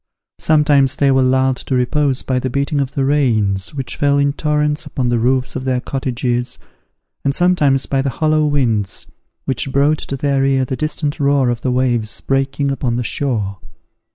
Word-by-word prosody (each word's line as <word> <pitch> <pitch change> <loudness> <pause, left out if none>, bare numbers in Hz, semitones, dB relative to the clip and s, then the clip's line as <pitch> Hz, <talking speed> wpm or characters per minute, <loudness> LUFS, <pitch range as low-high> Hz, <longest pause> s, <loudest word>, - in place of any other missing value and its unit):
Sometimes 145 -4 +3
they 140 -1 +2
were 130 0 +3
lulled 130 0 +2
to 130 - -3
repose 135 +2 0
by 130 -1 0
the 130 - -2
beating 140 +2 -1
of 135 -1 -3
the 135 - +1
rains, 110 -7 +1
which 130 -5 -3
fell 140 0 +2
in 140 0 +2
torrents 150 0 0
upon 125 -3 -2
the 120 -1 +1
roofs 130 +2 0
of - - -3
their 130 -1 0
cottages, 125 -2 -2 0.7
and 140 0 0
sometimes 155 -7 +2
by 135 -1 0
the 135 - -1
hollow 155 +3 +1
winds, 115 -9 -1 0.4
which 130 0 -2
brought 145 +3 +2
to 135 - -5
their 140 0 +1
ear 135 -1 +2
the 130 - -3
distant 155 +1 -3
roar 140 -3 +2
of 120 - -4
the 130 - -1
waves 120 -4 0
breaking 135 +1 -1
upon 125 -3 -1
the 120 - -1
shore. 110 -6 -2
135 Hz, 180 wpm, -17 LUFS, 125-145 Hz, 0.7 s, Sometimes